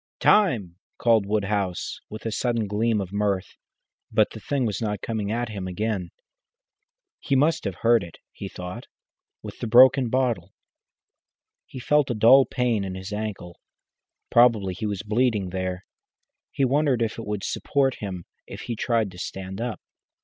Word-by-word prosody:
"Time!" 115 - +3 0.2
called 115 -4 +3
Woodhouse, 100 -3 -2
with 110 +1 -9
a 115 - -1
sudden 115 -1 0
gleam 105 +2 0
of 95 -1 -5
mirth, 100 -2 -1 0.6
but - - +3
the - - -9
thing 140 -3 -1
was 105 -1 -2
not 105 -3 -2
coming 105 -3 -2
at 120 +1 -2
him 100 -4 -5
again. 95 -1 -2 1.1
He 140 - -1
must 150 +2 +2
have 100 -3 -2
hurt 115 -1 +4
it, 85 -2 -10
he - - -7
thought, 90 0 -8 0.6
with - - -9
the 120 - -3
broken 125 +2 +6
bottle. 115 -8 -1 1.1
He - - -10
felt 150 +2 +2
a 120 - -1
dull 125 +5 +7
pain 120 -5 0
in 95 -1 -5
his 95 +2 -7
ankle. 105 -5 -5 0.7
Probably 115 -6 +4
he 110 +4 -4
was 100 -2 -3
bleeding 110 -3 0
there. 95 0 -4 0.6
He 135 -1 0
wondered 135 -2 +2
if 115 0 -3
it 115 - -7
would 105 -2 -3
support 135 -2 0
him 95 -4 -6 0.2
if - - -8
he 120 - -4
tried 115 -3 0
to 90 - -12
stand 95 +2 -6
up. 120 -5 -3
110 Hz, 165 wpm, -25 LUFS, 95-120 Hz, 1.1 s, dull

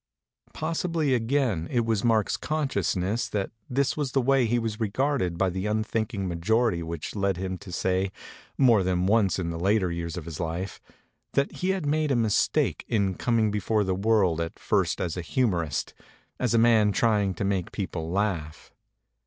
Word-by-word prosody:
Possibly 165 -2 0
again 115 - 0
it 120 -2 +1
was 110 -3 0
Mark's 110 -3 +2
consciousness 115 - -1
that 100 -2 -2 0.2
this 135 +2 +1
was 145 -4 -2
the 135 - +3
way 135 -1 +3
he 120 +2 +1
was 115 -2 -2
regarded 110 -4 0
by 95 0 +1
the 95 +3 -3
un 110 +1 +1
thinking 110 -3 -2
majority 95 +3 +1
which 85 +1 -5
led 100 -2 0
him 95 0 -3
to 100 -3 -10
say, 95 +2 0 0.5
more 120 -6 +5
than 90 -1 0
once 100 -3 +3
in 85 -3 -2
the 85 - -5
later 95 0 +2
years 85 -1 -4
of 85 - -6
his 80 -2 -7
life, 85 +3 -4 0.5
that 140 +1 +1
he 185 - -1
had 190 -4 0
made 155 +1 +1
a 135 - +2
mistake 110 -3 +1
in 100 -4 +1
coming 110 +1 +1
before 105 +1 +1
the 95 -1 0
world 95 -4 +2
at 85 -1 -4
first - - 0
as 85 - -2
a - - -2
humorist, 85 - -1 0.5
as 125 -2 +1
a - - +5
man 115 -2 +5
trying 105 -3 +2
to - - -3
make 95 -3 -1
people 85 -5 -4
laugh. 90 -5 -2
105 Hz, 180 wpm, -26 LUFS, 90-120 Hz, 0.5 s, more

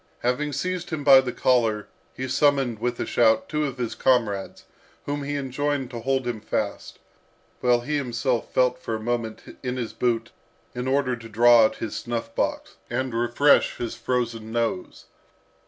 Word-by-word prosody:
Having 130 +4 0
seized 180 +4 -3
him 155 -3 -3
by 135 -2 +8
the 125 -1 -3
collar, 115 -4 +1 0.3
he 130 - -4
summoned, 135 -3 +2
with 120 +1 -2
a - - -1
shout, 110 -2 +3
two 150 -1 -1
of 135 -2 -4
his 120 -2 -3
comrades, 105 -7 0 0.4
whom 145 0 -2
he 145 +1 -3
enjoined 140 0 -2
to 120 - -5
hold 130 +2 0
him 120 -3 -3
fast, - - -3 0.6
while 120 -1 +3
he 150 +4 -1
himself 125 -2 -1
felt 125 0 +2
for 115 -3 -3
a - - -4
moment 115 -1 -4
in 125 -1 -3
his 120 -3 -4
boot, 115 -2 -1 0.4
in 125 +1 -4
order 130 -1 +1
to 115 -1 -11
draw 120 +1 +6
out 110 - 0
his 110 - -5
snuff 115 -1 -4
box, - - -2
and 130 -2 -2
refresh 120 +5 +3
his 120 - -4
frozen 115 -3 -2
nose. 115 -5 -2
125 Hz, 170 wpm, -24 LUFS, 115-135 Hz, 0.6 s, by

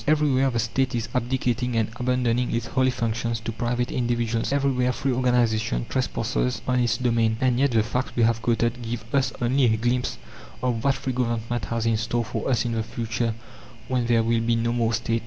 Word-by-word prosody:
Everywhere 145 -3 +3
the 120 - -2
State 120 +3 0
is 115 -1 -2
abdicating 125 -1 0
and 110 -2 +2
abandoning 125 -1 0
its 115 0 -1
holy 130 +2 +1
functions 115 -1 -1
to 115 - -4
private 120 +2 -1
individuals. 120 -1 0
Everywhere 135 -3 +2
free 135 - -1
organization 115 - +1
trespasses 125 0 -1
on 125 -1 +2
its 120 -1 +2
domain. 115 -3 +1
And 130 -1 +2
yet, 140 +1 +4
the 115 -3 +2
facts 125 +3 -3
we 120 - +3
have 115 0 +2
quoted 120 +1 0
give 115 0 -4
us 135 -1 +2
only 130 +2 +2
a 110 -2 +3
glimpse 125 +2 0 0.5
of 120 -3 0
what 140 -1 +3
free 130 - -3
government 120 -1 -1
has 115 -1 -2
in 115 -1 +2
store 115 +1 -1
for - - -3
us 120 -3 +1
in 120 - -1
the 115 -1 0
future 115 0 -2 0.5
when 125 -2 0
there 115 -1 +3
will 115 0 +1
be 115 0 +1
no 115 +1 0
more 115 -1 +1
State. 115 0 0
120 Hz, 200 wpm, -25 LUFS, 115-125 Hz, 0.5 s, yet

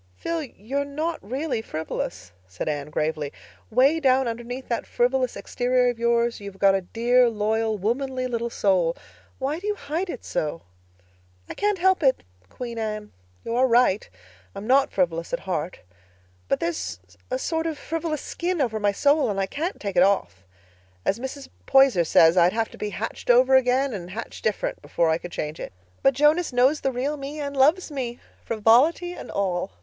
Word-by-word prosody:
"Phil, 335 -1 -2
you're 270 0 -4
not 310 +4 -3
really 255 +2 -3
frivolous," 155 - -5 0.2
said 95 -1 -6
Anne 145 -1 -2
gravely. 150 -1 -2 0.4
"'Way 270 +8 +4
down 265 -3 +3
underneath 240 +3 -5
that 235 - -2
frivolous 250 +1 +1
exterior 250 0 +1
of 235 - -11
yours 235 0 +1
you've 200 -1 -9
got 195 0 +5
a 195 - +1
dear, 240 +5 +3
loyal, 220 0 0
womanly 255 +5 -1
little 235 -1 -2
soul. 185 -6 +1 0.4
Why 280 +4 -2
do 405 - -6
you 420 - 0
hide 325 +3 -3
it 255 - -6
so?" 155 +2 -3 0.8
"I - - -6
can't 415 -1 0
help 375 +1 +3
it, 265 -3 +2 0.3
Queen 235 - -6
Anne. 215 -1 -4 0.3
You 230 - -2
are 255 +2 +4
right—I'm 95 - -1
not 270 +3 +3
frivolous 170 -2 -1
at 255 - -1
heart. 180 -2 -3 0.7
But - - +1
there's 90 - -3 0.3
a 255 - 0
sort 325 +4 -1
of 315 -2 -3
frivolous 320 -1 -3
skin 350 0 -2
over 230 -6 0
my 205 -1 +2
soul 285 +6 +2
and 200 -1 -1
I 195 - +1
can't 320 - -4
take 200 -3 -4
it - - +7
off. 180 - +1 0.6
As 200 - +1
Mrs. 265 +2 -6 0.2
Poyser 270 -10 +5
says, 165 +3 +5
I'd 175 +1 +5
have 225 0 0
to - - -13
be 210 - -2
hatched 210 +5 -6
over 255 +2 +6
again 260 +1 +3
and 180 -4 -6
hatched 220 +5 -7
different 215 -2 -1
before 165 -1 +1
I 160 - +1
could 175 - -8
change 150 0 -4
it. - - -6 0.3
But 270 -1 +4
Jonas 300 +5 +3
knows 255 +5 +3
the 270 - 0
real 270 +4 -2
me 285 +2 -6
and 285 -1 -4
loves 310 +6 +3
me, 250 -4 -4 0.2
frivolity 250 - +3
and - - -9
all. 180 - -2
240 Hz, 180 wpm, -24 LUFS, 195-275 Hz, 0.8 s, it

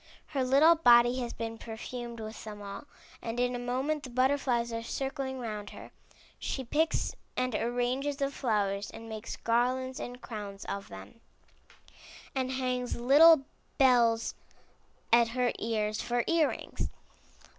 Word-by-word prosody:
Her 275 -3 0
little 280 +6 +6
body 245 -5 +5
has 240 -2 -3
been 225 0 -5
perfumed 235 +1 -7
with 220 0 -7
them 210 -1 -8
all, 200 +4 -8 0.4
and 230 +1 -4
in 245 0 +1
a - - -3
moment 260 +5 -1
the 260 - -8
butterflies 255 -2 +1
are 230 - -2
circling 265 +2 -3
round 215 -4 -5
her. - - -11 0.5
She 265 - -3
picks 310 +6 0 0.2
and 255 -1 0
arranges 245 +5 -1
the 275 -1 -1
flowers, 205 -6 -1
and 225 - -10
makes 220 -1 -6
garlands 255 +3 0
and 245 0 -6
crowns 205 -5 -7
of 200 0 -5
them, 95 - -11 1.1
and 260 -1 -1
hangs 250 -1 -1
little 285 +5 +7 0.3
bells 235 -4 +4 0.8
at 235 0 +6
her 250 -1 +2
ears 215 -1 -1
for 240 -1 0
ear 330 -3 +3
rings. - - -5
245 Hz, 145 wpm, -30 LUFS, 225-265 Hz, 1.1 s, little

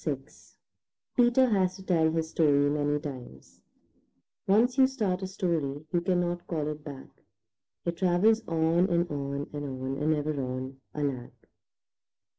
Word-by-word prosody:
VI 145 -4 0 1.0
PETER 245 +1 +5
HAS 185 -4 +2
TO 190 - -11
TELL 165 -4 +2
HIS 160 -1 -1
STORY 145 -3 +3
MANY 145 0 0
TIMES 130 - -9 0.9
Once 230 +6 +4
you 260 - +7
start 210 -9 -1
a 190 - -3
story 160 -7 -2
you 175 - +2
cannot 175 0 -1
call 155 -3 -2
it 150 0 -6
back; 140 -3 -9 0.8
It 170 -1 -2
travels 190 +5 +3
on 165 +2 +2
and 175 0 +2
on 140 0 -3
and 145 0 -4
on 130 -1 -4
and 155 +1 +2
ever 150 -1 -2
on, 130 +1 -5
alack! 140 -5 -4
160 Hz, 145 wpm, -28 LUFS, 145-180 Hz, 1.0 s, you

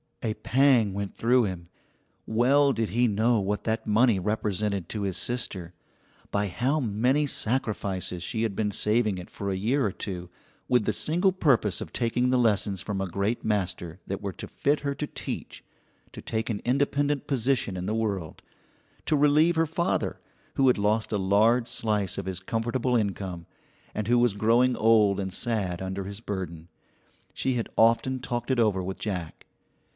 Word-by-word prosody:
A 110 - 0
pang 125 -6 +3
went 100 0 -4
through 125 +2 +3
him. 90 -3 -6 0.6
Well 135 +5 +3
did 115 -4 -1
he 120 +6 +2
know 110 +2 +2
what 105 +1 -2
that 110 0 -1
money 110 -1 +4
represented 105 -2 -1
to 105 - -4
his 95 -3 -2
sister; 95 -8 -3 0.6
by 100 0 0
how 125 +11 0
many 125 +5 +1
sacrifices 105 -9 -2
she 110 +5 -2
had 110 -4 -1
been 105 0 0
saving 105 -1 +1
it 90 - -8
for 100 - -4
a 95 - -1
year 115 +8 +1
or 100 - 0
two, 90 -3 -6 0.4
with 125 -4 +3
the 110 - +1
single 175 +5 +2
purpose 125 - +2
of - - -6
taking 125 +1 +1
the 130 - +3
lessons 100 -5 +1
from 100 +1 -3
a 95 - -1
great 100 +6 -2
master 90 -4 -2
that 100 - -4
were 100 -2 -4
to - - -8
fit 145 +1 0
her 140 -1 -1
to 150 - -3
teach, - - -6 0.5
to - - -8
take 110 +1 -3
an 105 - -3
independent 140 +2 +1
position 130 -6 0
in 90 0 -4
the 110 - -1
world, 100 -8 -3 0.6
to 155 - +2
relieve 150 +4 +4
her 165 0 +2
father, 170 +2 -1 0.4
who 135 - +3
had 125 - +4
lost 105 +2 +1
a 105 - +1
large 110 +5 +3
slice 105 -5 -1
of 100 - -5
his 95 -2 -3
comfortable 120 +5 -1
income, 95 -6 -2 0.5
and 105 -1 -3
who 120 +1 +4
was 120 -4 +2
growing 120 +4 +3
old 110 -3 +4
and 95 -2 -3
sad 100 -7 -1
under 95 +1 -4
his 100 +1 -7
burden. 90 -6 -6 0.6
She 130 - -1
had 115 -2 -2
often 115 +3 +3
talked 120 -1 -4
it 130 - +1
over 105 -5 +2
with 95 +1 -5
Jack. 90 -6 -5
110 Hz, 180 wpm, -27 LUFS, 100-125 Hz, 0.6 s, money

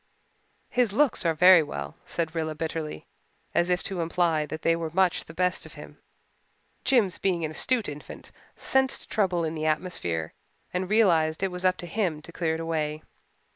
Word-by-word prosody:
"His 245 -5 +2
looks 260 - +2
are 165 - +2
very 180 +1 +8
well," 70 - -5
said 165 -1 -3
Rilla, 160 -2 -2
bitterly, 160 - -4 0.5
as 175 - +2
if 180 0 +1
to 185 -3 -3
imply 165 -2 +1
that 155 +2 -6
they 165 - +4
were 165 -1 -3
much 185 +2 +1
the 160 - -11
best 180 +1 +1
of - - -12
him. - - -12 0.8
Jims, 235 -9 +2
being 175 -4 0
an 155 - -4
astute 235 +7 0
infant, 150 0 -9 0.2
sensed 265 0 +1
trouble 185 -5 +1
in 160 - -2
the 155 -1 -2
atmosphere 90 - -2 0.4
and 180 +1 -2
realized 170 -8 +3
that - - +2
it 190 - -2
was 180 +1 -4
up 185 0 +3
to - - -7
him 175 -3 -1
to 170 - -10
clear 165 -2 -1
it - - -5
away. 155 -2 -2
170 Hz, 185 wpm, -27 LUFS, 155-185 Hz, 0.8 s, very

